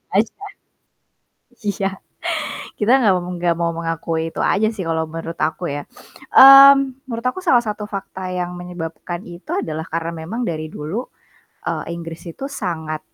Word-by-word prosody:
aja. 215 +2 +3 1.3
Iya, 200 -1 0 0.9
kita 215 +3 +2
nggak 210 -6 +4
mau 175 - -6
nggak 170 -1 +1
mau 170 0 +1
mengakui 165 -1 -2
itu - - -6
aja 215 +2 +2
sih, 195 - -4
kalau 160 0 +1
menurut 165 0 -5
aku 160 +3 -7
ya. 145 - -3 0.5
Mmm, 275 0 +9
menurut 230 -1 -5
aku 315 - -6
salah 240 -4 +5
satu 210 0 -3
fakta 190 -1 -6 0.2
yang 180 0 -2
menyebabkan 175 0 -6
itu 175 +1 -12
adalah 160 0 -4
karena 165 0 -1
memang 225 +9 -4
dari 155 -1 -3
dulu, 155 +7 -4 0.7
eee, - - -2
Inggris 165 -1 -8
itu 270 - -8
sangat 160 - -4
175 Hz, 150 wpm, -20 LUFS, 165-220 Hz, 1.3 s, Mmm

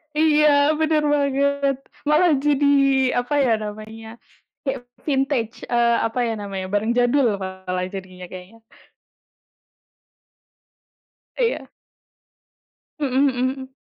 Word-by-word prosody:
Iya, 300 -1 +4 0.3
bener 310 -1 +2
banget. 280 -1 +1 0.3
Malah 315 +3 +4
jadi, 290 0 +1 0.5
apa, 245 +4 -4
ya, 225 -4 +2
namanya, 220 +2 -8 0.5
kayak 255 -3 -4 0.2
vintage, 270 -5 -1
eee, 235 -1 +2
apa, 225 +2 -2
ya, 230 -1 -1
namanya, 195 -2 -5
barang 210 +3 0
jadul 245 -2 +3
malah 190 -1 -4
jadinya, 185 -2 -9
kayaknya. 185 +5 -11 2.8
Iya. 480 -1 -1 1.3
Mhm 275 -1 +1
mhm. 260 0 -1
245 Hz, 95 wpm, -22 LUFS, 215-280 Hz, 2.8 s, Iya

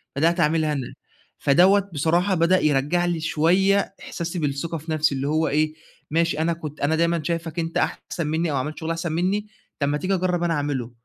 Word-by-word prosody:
بدأت 165 +5 +2
أعملها 155 -1 +2
أنا، 135 -4 -4 0.4
فدوّة 190 +7 +4
بصراحة 175 +6 +2
بدأ 170 +3 +3
يرجع 150 +4 +1
لي 175 -2 -1
شوية 185 +6 +2
إحساسي 170 +1 -5
بالثقة 150 +2 -2
في 160 +1 -7
نفسي 155 -2 +2
اللي 135 +1 -2
هو 155 +1 +1
إيه، 155 +1 +1 0.4
ماشي 165 -1 +1
أنا 165 +1 +1
كنت 155 -2 -8
أنا 145 +3 +2
دايمًا 170 -1 +1
شايفك 165 0 -3
أنت 165 0 -2
أحسن 165 -3 -2
مني 160 +1 0
أو 145 - -1
عملت 150 +4 -3
شغل 160 - -4
أحسن 165 0 -3
مني 190 +6 0 0.3
طب 140 - +1
ما 145 - 0
تيجي 185 +4 -1
أجرب 180 -2 0
أنا 170 -1 +1
أعمله، 140 -5 -2
165 Hz, 195 wpm, -23 LUFS, 150-175 Hz, 0.4 s, فدوّة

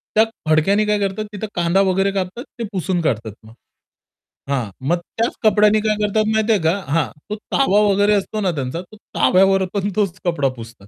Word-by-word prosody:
त्या 220 - +6 0.3
फडक्याने 195 +7 +3
काय 210 0 +1
करतात, 200 +1 -2
तिथं 210 +1 -5
कांदा 175 +2 +2
वगैरे 195 +1 +1
कापतात 195 +4 -4 0.2
ते - - -2
पुसून 185 -2 -1
काढतात 115 -8 -1
मग. 110 +1 -15 1.0
हां, 125 -6 -1 0.2
मग 175 +3 +2 0.2
त्याच 230 +2 0
कपड्याने 210 0 +4
काय 215 0 +1
करतात 210 +1 +1
माहिती 220 +1 +1
आहे 205 - +1
का? 160 +3 +3 0.2
हां, 160 -5 +2 0.2
तो 210 - -2
तवा 210 -2 +1
वगैरे 205 +1 +3
असतो 210 +1 -1
ना 190 -3 +1
त्यांचा, 140 +4 -3
तो 185 +4 -16 0.2
तव्यावर 195 +1 +4
पण 200 -1 -1
तोच 195 -4 -1
कपडा 165 -6 +1
पुसतात. 115 -3 -12
195 Hz, 190 wpm, -20 LUFS, 170-210 Hz, 1.0 s, त्या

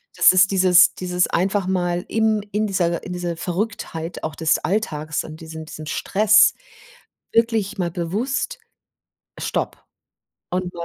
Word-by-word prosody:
das - - +7
ist 185 +1 +4
dieses 185 -1 +5
dieses 180 0 0
einfach 190 +2 0
mal 175 -1 -1
im 220 -1 +1
in 215 +1 0
dieser 175 -4 0
in 180 - -7
dieser 175 -1 -3
Verrücktheit 180 -3 -4
auch 155 -2 -4
des 160 -1 +1
Alltags 160 -7 -2
und 155 +1 -10
diesen 160 0 -8
diesen 155 0 -9
Stress 215 +6 +4 0.8
wirklich 225 -4 +1
mal 175 -2 0
bewusst 225 - -2 0.8
stopp. - - -3 0.7
Und, 180 0 -2
180 Hz, 135 wpm, -21 LUFS, 170-210 Hz, 0.8 s, das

